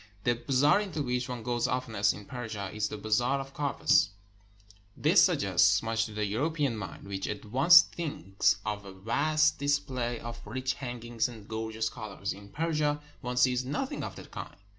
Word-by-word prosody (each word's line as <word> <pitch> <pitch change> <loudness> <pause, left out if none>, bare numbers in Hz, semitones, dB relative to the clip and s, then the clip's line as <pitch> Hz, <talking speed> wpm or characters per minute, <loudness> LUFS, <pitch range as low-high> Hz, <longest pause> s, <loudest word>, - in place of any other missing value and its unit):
The 120 - +3
bazaar 135 - +3
into 185 -8 -3
which 125 0 -2
one 125 -2 -5
goes 120 +1 0
oftenest 110 -6 +1
in 105 - -10
Persia 110 -6 -5
is 105 0 -1
the 110 - -5
Bazaar 120 +6 +1
of 135 0 -7
Carpets. 145 -2 +2 0.9
This - - +5
suggests - - +3
much 115 0 0
to - - -11
the 105 0 -1
Euro 115 +10 0
pean 145 -7 -1
mind, 100 -1 -7
which 95 -1 -3
at 105 +1 -5
once 140 +9 +8
thinks 105 - 0
of 105 -1 -3
a 100 -1 -10
vast 155 +10 +1
display 135 -4 -1
of 115 0 -7
rich 130 +4 -2
hangings 120 -3 -3
and 110 -4 -11
gorgeous 110 0 -3
colors. 110 -4 -5
In 100 0 -13
Persia 150 +1 0 0.2
one 125 -1 -4
sees 125 0 +3
noth 135 +3 -3
ing - - -4
of - - -6
the - - -10
kind. - - -8
120 Hz, 185 wpm, -29 LUFS, 110-140 Hz, 0.9 s, once